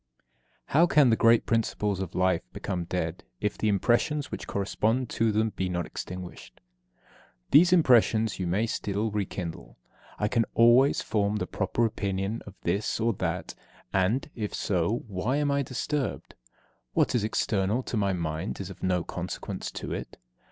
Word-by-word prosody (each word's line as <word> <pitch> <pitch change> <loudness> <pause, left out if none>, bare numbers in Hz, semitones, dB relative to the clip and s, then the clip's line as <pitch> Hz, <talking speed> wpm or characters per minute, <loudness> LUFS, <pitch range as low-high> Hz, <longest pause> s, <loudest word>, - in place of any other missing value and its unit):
2. - - -41 0.5
How 165 +5 +6
can 145 -7 +5
the - - +5
great 115 +1 +4
principles 105 -3 0
of 95 -3 -5
life 90 -2 +2
become 90 -3 -3
dead 85 -1 -3 0.2
if 105 - -1
the 110 - -1
impressions 120 - +1
which - - -6
correspond 110 +5 0
to 115 0 +2
them 110 +1 +1
be 95 -1 -1
not 90 -2 -2
extinguished? 90 0 -8 0.9
These 170 +5 +7
impressions 115 - +4
you 90 - -1
may 100 +6 +1
still 105 -1 -2
rekindle. 90 -10 -5 0.4
I 105 - 0
can 115 +1 +1
always 120 +4 +5
form 105 -1 0
the 105 - -1
proper 105 +4 0
opinion 100 0 -2
of 100 - -10
this 100 +6 0
or 115 +1 +2
that; 85 0 -2 0.4
and, 95 +8 +1
if 105 -3 -4
so, 95 +5 0
why 105 +7 -1
am 145 -1 +1
I 140 0 +2
disturbed? 135 +2 -3 0.6
What - - +2
is 120 - +1
external 105 +2 0
to - - -4
my 100 -2 +1
mind 85 +1 -3
is 95 -1 -5
of - - -13
no 90 -2 +1
consequence - - -5
to - - -5
it. - - -6
105 Hz, 165 wpm, -27 LUFS, 95-115 Hz, 0.9 s, These